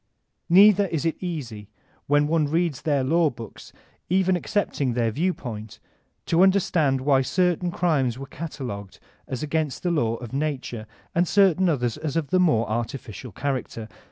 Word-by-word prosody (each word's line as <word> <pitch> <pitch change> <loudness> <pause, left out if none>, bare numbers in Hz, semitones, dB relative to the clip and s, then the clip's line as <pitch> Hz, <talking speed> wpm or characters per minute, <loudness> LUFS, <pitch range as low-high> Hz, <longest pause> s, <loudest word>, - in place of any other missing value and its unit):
Neither 200 +2 +6
is 165 -2 -3
it 165 - +1
easy 125 - -5 0.4
when 145 +1 +3
one 155 0 +1
reads 165 -2 0
their 145 -4 +1
law 160 +4 +3
books, 115 -5 -11 0.4
even 185 +1 +2
accepting 175 - -1
their 115 -1 0
view 170 +10 0
pointy 110 - -8 0.5
to 165 +1 +2
understand 170 -8 +3
why 135 -1 +3
certain 180 +4 +1
crimes 150 -9 0
were 135 - -7
cata* 150 +1 -7
logued 100 -5 -6 0.3
as 130 +3 -4
against 155 -2 -2
the 175 - +1
law 115 -9 +1
of 120 0 -9
nature, 135 -6 -3 0.3
and 175 +1 +2
certain 190 -2 +4
others 125 -6 -1
as 155 -2 -4
of 165 -2 -2
the 185 - +3
more 150 -11 +3
artificial 115 0 -5
character. 130 -2 -4
145 Hz, 160 wpm, -24 LUFS, 125-175 Hz, 0.5 s, Neither